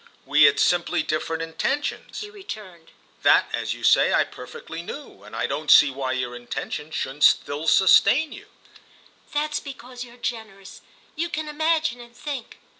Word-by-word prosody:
"We 150 Hz, 0 st, +5 dB
had 140 Hz, 0 st, +4 dB
simply 175 Hz, -2 st, +2 dB
different 160 Hz, +2 st, -2 dB
intentions," 225 Hz, -, -3 dB
he 420 Hz, 0 st, -8 dB
returned. 210 Hz, -, -10 dB, 0.3 s
"That, -, -, +5 dB
as -, -, -2 dB
you -, -, -13 dB
say, -, -, +5 dB
I -, -, +4 dB
perfectly 475 Hz, 0 st, -9 dB
knew, 470 Hz, -, -9 dB
and -, -, -11 dB
I -, -, -1 dB
don't 155 Hz, +1 st, -4 dB
see 145 Hz, -2 st, +8 dB
why 130 Hz, -1 st, -3 dB
your 125 Hz, -1 st, -3 dB
intention 135 Hz, +5 st, -5 dB
shouldn't 145 Hz, -1 st, -3 dB
still 145 Hz, +3 st, +3 dB
sustain 265 Hz, -, +5 dB
you." -, -, -11 dB, 0.8 s
"That's 300 Hz, 0 st, -1 dB
because 255 Hz, -3 st, -9 dB
you're 240 Hz, 0 st, -14 dB
generous—you 225 Hz, -, -7 dB
can 315 Hz, -1 st, -4 dB
imagine 315 Hz, -3 st, 0 dB
and 240 Hz, 0 st, -15 dB
think. 275 Hz, -2 st, -6 dB
220 Hz, 155 wpm, -24 LUFS, -, 0.8 s, see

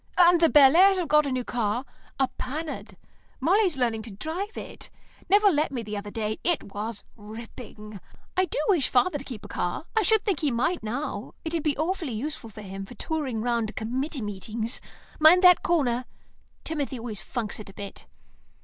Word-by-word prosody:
And 350 Hz, -1 st, +6 dB
the 330 Hz, -, +6 dB
Bellairs 330 Hz, +8 st, +7 dB
have 355 Hz, -3 st, -1 dB
got 300 Hz, 0 st, +4 dB
a -, -, -2 dB
new 255 Hz, -1 st, -1 dB
car, 235 Hz, +1 st, -1 dB, 0.3 s
a 265 Hz, -, +4 dB
Panhard; 255 Hz, -, -5 dB, 0.4 s
Molly's 360 Hz, +2 st, +3 dB
learning 235 Hz, -3 st, 0 dB
to 220 Hz, -, -9 dB
drive 325 Hz, -, -5 dB
it. -, -, -8 dB, 0.4 s
Nevill 405 Hz, -1 st, +5 dB
let 300 Hz, 0 st, +1 dB
me 245 Hz, -4 st, -3 dB
the 210 Hz, -1 st, -5 dB
other 205 Hz, 0 st, -5 dB
day; 215 Hz, 0 st, -3 dB
it 345 Hz, -2 st, +1 dB
was 210 Hz, +1 st, -4 dB
ripping. 215 Hz, -1 st, -10 dB, 0.4 s
I 370 Hz, -, +3 dB
do 350 Hz, -, -5 dB
wish 345 Hz, -10 st, +3 dB
father'd 280 Hz, +2 st, +1 dB
keep 230 Hz, -7 st, -8 dB
a -, -, -7 dB
car. 175 Hz, -, -3 dB
I 445 Hz, -, +4 dB
should 435 Hz, +1 st, +3 dB
think 385 Hz, -8 st, +1 dB
he 300 Hz, -, +1 dB
might 275 Hz, +9 st, 0 dB
now. 245 Hz, +7 st, -4 dB
It 320 Hz, -, -3 dB
would 330 Hz, -, 0 dB
be 295 Hz, -2 st, 0 dB
awfully 320 Hz, -3 st, -1 dB
useful 240 Hz, +1 st, -4 dB
for 215 Hz, 0 st, -10 dB
him 195 Hz, 0 st, -6 dB
for 245 Hz, -, -11 dB
touring 270 Hz, -4 st, -2 dB
round 235 Hz, -2 st, +1 dB
to 215 Hz, -, -8 dB
committee 260 Hz, +4 st, -3 dB
meetings. 215 Hz, +3 st, -3 dB, 0.4 s
Mind 330 Hz, +4 st, +7 dB
that 360 Hz, -1 st, +8 dB
corner; 255 Hz, -8 st, +1 dB, 0.6 s
Timothy 290 Hz, -4 st, -2 dB
always 225 Hz, -5 st, -6 dB
funks 230 Hz, -2 st, -4 dB
it 210 Hz, -, -9 dB
a -, -, -13 dB
bit." 200 Hz, -1 st, -8 dB
260 Hz, 190 wpm, -26 LUFS, 220-320 Hz, 0.6 s, that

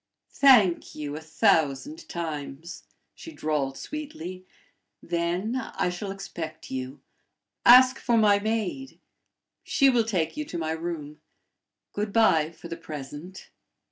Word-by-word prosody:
"Thank 225 Hz, -11 st, +5 dB
you 145 Hz, -1 st, -5 dB
a 155 Hz, -, -6 dB
thousand 160 Hz, -, +1 dB
times," 160 Hz, 0 st, -6 dB, 0.3 s
she 325 Hz, -, -11 dB
drawled, 145 Hz, -, -2 dB
sweetly. 185 Hz, -, -7 dB, 0.6 s
"Then 175 Hz, +6 st, -1 dB, 0.2 s
I 180 Hz, -, 0 dB
shall 185 Hz, +3 st, -5 dB
expect 195 Hz, -4 st, -7 dB
you. 130 Hz, +1 st, -5 dB, 0.7 s
Ask 255 Hz, +2 st, +8 dB
for 235 Hz, -1 st, +1 dB
my 205 Hz, -2 st, +5 dB
maid. 225 Hz, +5 st, -3 dB, 0.6 s
She 275 Hz, -1 st, +4 dB
will 240 Hz, -2 st, +3 dB
take 185 Hz, -8 st, -1 dB
you 300 Hz, -, -3 dB
to 180 Hz, -, -6 dB
my 160 Hz, -1 st, -2 dB
room. 160 Hz, -2 st, -5 dB, 0.7 s
Good 205 Hz, 0 st, -2 dB
by 165 Hz, -9 st, +4 dB
for 170 Hz, +1 st, -12 dB
the 165 Hz, 0 st, -6 dB
present." 150 Hz, +5 st, -9 dB
175 Hz, 125 wpm, -26 LUFS, 155-225 Hz, 0.7 s, Ask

